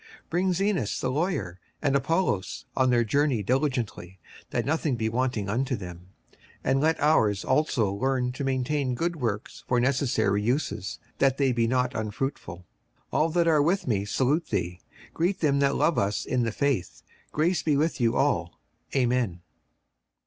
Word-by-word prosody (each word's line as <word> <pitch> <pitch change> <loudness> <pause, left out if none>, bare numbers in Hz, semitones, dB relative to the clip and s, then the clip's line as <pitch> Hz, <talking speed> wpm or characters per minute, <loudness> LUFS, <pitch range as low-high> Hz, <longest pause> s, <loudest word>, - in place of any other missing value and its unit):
56:003:013 450 - -21 0.2
Bring 180 +2 +1
Zenas 180 - 0
the 130 - -1
lawyer 145 - -2 0.2
and 140 -2 +1
Apollos 140 - 0
on 130 -1 +3
their 120 -1 +4
journey 130 -1 +1
diligently, 115 - -1 0.3
that - - -1
nothing 150 -2 0
be 110 -1 -1
wanting 120 -3 -1
unto 125 +5 0
them. 90 -3 -9 0.2
56:003:014 - - -29 0.2
And 135 +1 +2
let 160 +2 +2
our's 110 -10 +3
also 130 -7 +2
learn 125 +3 0
to 135 +3 -5
maintain 135 0 0
good 170 +5 -1
works 115 -6 -3
for 125 - +2
necessary 120 -6 +1
uses, 110 -4 -1 0.2
that 135 -1 +3
they 135 -2 +2
be 115 -1 +1
not 125 +1 +1
unfruitful. 105 -6 -4 0.5
56:003:015 - - +2
All 160 - +2
that 170 +1 +2
are 155 -3 +4
with 175 +6 +1
me 100 -5 +1
salute 135 +10 0
thee. 90 -4 -2 0.3
Greet 180 +4 0
them 140 -3 +2
that 140 0 +2
love 165 - +2
us 100 +1 -1
in 125 - 0
the 115 -1 0
faith. 140 -6 -1 0.3
Grace 165 +4 +1
be 150 -3 +1
with 155 -2 0
you 115 0 +2
all. 85 - 0 0.4
Amen. 120 -9 +1
130 Hz, 170 wpm, -27 LUFS, 110-150 Hz, 0.5 s, their